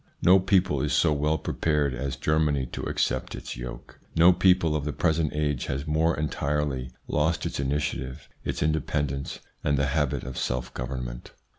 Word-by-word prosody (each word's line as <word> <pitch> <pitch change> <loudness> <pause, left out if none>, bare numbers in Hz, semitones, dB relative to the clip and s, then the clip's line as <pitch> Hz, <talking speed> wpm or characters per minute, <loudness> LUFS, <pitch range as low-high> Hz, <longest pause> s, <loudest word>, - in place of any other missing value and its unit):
No 95 +2 +7
people 95 -6 +2
is 75 - 0
so 80 -3 +4
well 75 +2 +1
prepared 75 -2 0
as 65 +1 -3
Germany 75 -3 +1
to - - -4
accept 65 +1 -1
its - - -6
yoke. - - -8 0.2
No 85 +2 +7
people 90 -3 +3
of 75 - -1
the 75 0 -2
present 80 -3 +1
age 75 -3 -1
has 70 +1 -2
more 80 0 +2
entirely 75 -3 -1 0.2
lost 80 +2 +1
its - - -3
initiative, 70 -2 -2 0.2
its - - -2
independence, 75 -3 -1 0.2
and 70 - +2
the 70 - +2
habit 75 -3 0
of 65 0 -5
self 60 0 -2
government. 60 -1 -5
75 Hz, 165 wpm, -27 LUFS, 65-80 Hz, 0.2 s, No